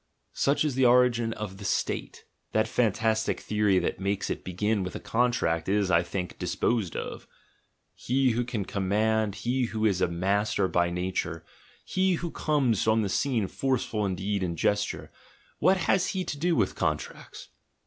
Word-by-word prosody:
Such 140 +2 +1
is 150 - 0
the 130 0 +4
origin 120 -2 +4
of 105 -3 -6
the 100 - -10
"State." 95 - -2 0.3
That 110 0 +3
fantas 110 -1 +1
tic - - -2
theory 105 -2 +1
that - - -1
makes 100 +1 -1
it - - -4
begin 105 +3 -1
with 90 0 -4
a - - -4
contract 115 -9 0
is, 100 -2 +1
I 85 - +5
think, 90 0 -5
disposed 110 -7 -1
of. - - -6 0.7
He 130 +1 +1
who 120 +2 0
can 115 -5 -3
command, 105 +2 0
he 125 +1 +1
who 110 -1 -2
is 95 -4 +2
a 90 - +4
master 95 +4 0
by 85 -1 +1
"nature," 90 -2 -3 0.4
he 185 0 +1
who 170 -1 -3
comes 135 - +1
on 110 0 +3
the 100 - -1
scene 115 -2 0
forceful 125 -3 -1
in 95 - -1
deed 100 +2 -2
and 85 -2 -2
gesture 105 +5 -1 0.2
— - - -33
what 190 +1 +4
has 185 +1 +2
he 185 - 0
to - - -3
do 170 +2 +2
with 105 -5 +1
contracts? - - -4
105 Hz, 180 wpm, -27 LUFS, 95-125 Hz, 0.7 s, I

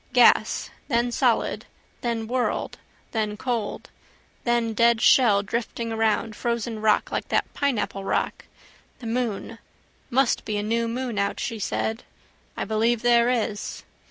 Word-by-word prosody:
Gas: - - +4 0.2
then 240 -2 +1
solid: - - +1 0.3
then 230 -2 -1
world: 245 +2 -1 0.3
then 215 -2 -1
cold: 235 -4 -3 0.5
then 235 -2 +1
dead 235 +1 +4
shell 215 -5 +5
drifting 230 +2 -3
around, 220 0 0
frozen 235 -1 -2
rock, 215 -1 +2
like - - -2
that - - 0
pineapple 240 -8 -1
rock. - - -1 0.5
The 250 - -11
moon. 230 -1 -2 0.5
Must 265 0 +2
be 210 - -2
a 205 - -1
new 230 +2 0
moon 240 -2 -3
out, 200 0 -1
she 225 - -3
said. 220 +3 -2 0.6
I - - -2
believe 225 +2 +1
there 240 0 +5
is. 220 -4 -2
230 Hz, 135 wpm, -25 LUFS, 215-240 Hz, 0.6 s, shell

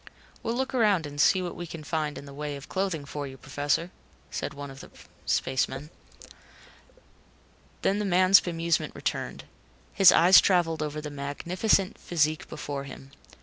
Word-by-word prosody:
"We'll 230 - -2
look 265 +2 -2
around 210 -9 +3
and 145 0 -3
see 185 +3 +4
what 175 - -5
we 175 - -6
can 160 -1 -8
find 150 -1 -2
in - - -9
the 140 - -11
way 145 0 -5
of 140 +1 -10
clothing 185 -6 -2
for 145 0 -5
you, 135 0 -10
Professor," 145 +6 -2 0.6
one 140 -1 -8
of 135 - -12
the - - -11 0.4
spacemen 135 +3 -1 0.3
said. - - -14 1.5
Then 200 +2 +2
the - - -1
man's 185 +1 +6
bemusement 170 -1 -1
returned. - - -4 0.5
His 195 -3 +8
eyes 180 +3 +7
traveled 170 -4 +2
over 150 0 -3
the 150 -1 -6
magnificent 175 +8 0
physique 155 -2 0
before 140 -1 -5
him. 135 0 -11
155 Hz, 160 wpm, -27 LUFS, 145-185 Hz, 1.5 s, His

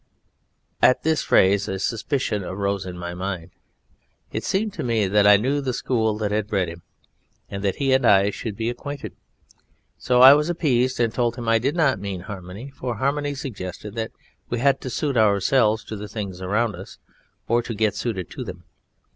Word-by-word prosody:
At 130 - +4
this 160 0 +2
phrase 100 +2 +3
a 95 - -2
suspicion 115 +1 -1
rose 100 0 -2
in 90 -1 -7
my 85 0 -5
mind; 90 -1 -5 0.8
it - - -3
seemed 205 +2 -1
to 175 - -5
me 115 -4 +1
that 100 +1 +3
I 105 0 +8
knew 135 +7 0
the 130 -2 -2
school 110 -4 0
that 105 -1 -2
had 105 0 0
bred 95 -5 0
him, 85 +1 -10 0.7
and 100 0 -5
that 100 -2 0
he 135 -2 +1
and 130 0 +3
I 100 -3 +5
should 105 0 -5
be 115 - -2
acquainted. 145 +3 -7 0.9
So 125 0 +4
I 135 +1 +11
was 150 +3 +2
appeased 130 -7 +1
and 115 -2 +1
told 120 -2 0
him 120 -2 -6
I 115 0 +4
did 135 +7 -1
not 150 - +2
mean 95 -2 -5
Harmony, 95 +7 -8
for 125 -3 -4
Harmony 145 +4 -1
suggested 105 -6 -6
that 110 -1 -3 0.4
we 120 - -1
had 135 +2 +2
to 130 - -5
suit 140 +1 -1
ourselves 110 +2 +3
to 110 - -7
the 105 0 -7
things 100 -4 -6
around 105 +4 0
us - - -11 0.5
or 120 +1 +2
to 120 -1 -6
get 105 -1 +1
suited 105 -4 -4
to - - -6
them. - - -9
110 Hz, 195 wpm, -23 LUFS, 100-130 Hz, 0.9 s, I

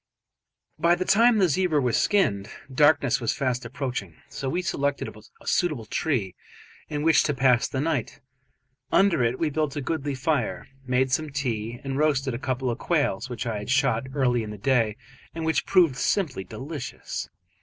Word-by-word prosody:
By 170 +1 +4
the 185 +1 -3
time 230 +4 +5
the 190 -3 +4
zebra 165 0 +2
was 125 -4 +1
skinned, 105 - +2 0.2
darkness 140 -3 +4
was 115 - 0
fast 130 -2 -1
approaching, 125 - -4
so 135 - -4
we 180 +5 -1
selected 140 -5 -1 0.3
a - - -18
suitable 155 -11 0
tree 105 - -1 0.6
in 150 -1 -2
which 160 0 +5
to 145 - 0
pass 125 -2 +3
the 130 - -3
night. 145 -4 -2 0.7
Under 195 -9 +4
it 120 +2 +1
we 155 +1 0
built 155 -1 -1
a - - -2
goodly 145 0 -2
fire, 130 - -1 0.2
made 130 +1 +1
some 155 +4 0
tea, 120 -4 -3
and 135 0 -3
roasted 140 -4 +1
a 120 - -4
couple 130 -2 -1
of 115 - -5
quails 145 - 0
which 120 -2 -4
I 110 -3 -2
had 105 - -7
shot 130 -2 +2
early 125 -4 +2
in 110 - -5
the 105 - -7
day 115 -1 +1 0.4
and 165 -1 -3
which 160 - 0
proved 175 -8 +4
simply 145 - 0
delicious. 135 - -6
135 Hz, 175 wpm, -25 LUFS, 120-155 Hz, 0.7 s, time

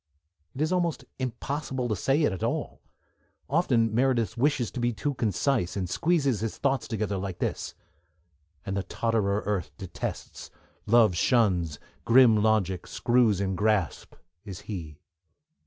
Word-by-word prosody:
It 135 - -4
is 155 - +1
almost 175 -3 -1
impossible 130 +1 -3
to 110 - 0
say 135 - +1
it 145 - +3
at 95 - -6
all. - - -3 0.7
Often 125 -8 +2
Meredith 120 -4 +1
wishes 130 -2 +1
to - - -5
be 120 0 +1
too 120 +7 -2
concise, 115 -3 0
and 95 -2 -2
squeezes 140 - +1
his 115 -1 -3
thoughts 135 -3 0
together 105 -2 -2
like 95 -1 -4
this: - - -3 0.9
and 95 - -3
the 100 - 0
totterer 105 +1 -1
Earth 100 -7 -1
detests, 95 -2 -6 0.4
Love 110 -4 +5
shuns, 90 - +2 0.3
grim 120 -1 +6
logic 105 -4 +1
screws 120 -5 +2
in 95 -1 -1
grasp, 105 -5 0 0.3
is 95 -4 -8
he. 80 -8 -7
110 Hz, 140 wpm, -27 LUFS, 100-130 Hz, 0.9 s, grim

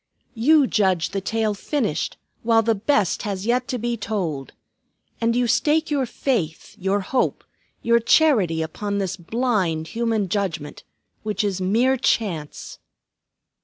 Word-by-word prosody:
You 280 +5 +4
judge 190 -8 +1
the 195 +2 -3
tale 220 +1 0
finished 205 - -2 0.2
while 225 -1 +3
the 225 +1 +2
best 210 - +1
has 200 -2 -4
yet 250 +2 +1
to 250 - -2
be 240 0 -2
told. 175 - -3 0.7
And 230 0 +2
you 245 0 +2
stake 300 +7 +2
your 275 -3 +1
faith, 200 - -2
your 195 +2 0
hope, 250 +7 -1 0.4
your 235 0 +4
charity 220 - +3
upon 200 +6 -3
this 190 -2 -1
blind 185 -5 -1
human 225 -3 0
judgment, 175 -6 -3 0.4
which 215 0 -2
is 195 -2 -1
mere 235 +8 +2
Chance!" 190 - -2
215 Hz, 135 wpm, -23 LUFS, 185-240 Hz, 0.7 s, You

